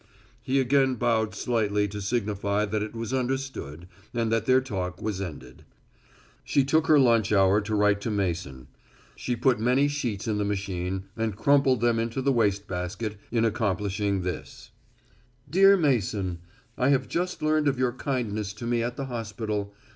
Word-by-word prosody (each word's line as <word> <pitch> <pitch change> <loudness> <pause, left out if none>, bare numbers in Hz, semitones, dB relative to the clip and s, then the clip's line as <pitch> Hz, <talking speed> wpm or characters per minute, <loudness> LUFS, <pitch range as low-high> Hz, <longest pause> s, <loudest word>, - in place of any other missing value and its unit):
He 130 +4 +1
again 135 0 +3
bowed 115 -2 0
slightly 105 -4 0
to 105 +1 -6
signify 100 -1 -1
that 105 0 -2
it 110 +2 -5
was 115 +2 -4
understood 130 - -3 0.3
and 115 -1 0
that 115 0 0
their 130 0 +6
talk 95 -8 -4
was 105 -3 -3
ended. 70 -9 -8 0.8
She 140 - +2
took 155 +4 +2
her 155 - +6
lunch 115 -6 +4
hour 100 0 +4
to 105 +1 -2
write 105 -1 +3
to 115 - -3
Mason. 85 - -2 0.5
She 125 - -2
put 120 0 +2
many 125 +5 +3
sheets 120 -9 -3
in 105 -2 0
the - - +1
machine 95 -2 -3
and 110 -3 -2
crumpled 135 -1 +3
them 120 -1 +2
into 115 +3 -2
the 135 +1 +2
waste 100 -4 +1
basket 95 +4 -4 0.2
in 115 -1 +2
accomplishing 100 -2 -1
this: 90 -3 -6 0.8
_Dear 195 +3 +6
Mason: 105 - 0 0.4
I 130 +1 +3
have 135 -2 +2
just 180 -1 -2
learned 155 -1 +2
of 135 -2 +1
your 125 -1 +1
kindness 110 -7 -3
to 120 +3 -8
me 120 0 +1
at 120 +1 -2
the 135 - -3
hospital. 110 -4 -4
110 Hz, 170 wpm, -26 LUFS, 100-130 Hz, 0.8 s, their